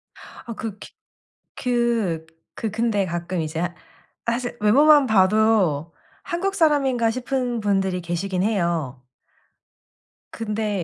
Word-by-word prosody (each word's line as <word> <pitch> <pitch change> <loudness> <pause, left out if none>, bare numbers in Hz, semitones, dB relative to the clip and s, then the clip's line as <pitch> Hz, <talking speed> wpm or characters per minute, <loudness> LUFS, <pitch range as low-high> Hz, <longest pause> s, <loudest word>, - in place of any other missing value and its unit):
아 235 - -10
그 220 -3 -5
기 - - -11 0.6
그 235 -9 0 0.3
그 220 - -3
근데 215 -2 0
가끔 175 0 -3
이제 155 +1 -4
하 175 +1 -2 0.5
사실 240 +1 -2
외모만 285 +7 +6
봐도 190 - +3 0.3
'한국 390 +3 -2
사람인가.' 275 - +2
싶은 250 0 -2
분들이 195 -3 0
계시긴 180 +2 -2
해요. 170 - -1 1.3
근데 210 -3 -2
215 Hz, 205 characters per minute, -23 LUFS, 180-240 Hz, 1.3 s, 외모만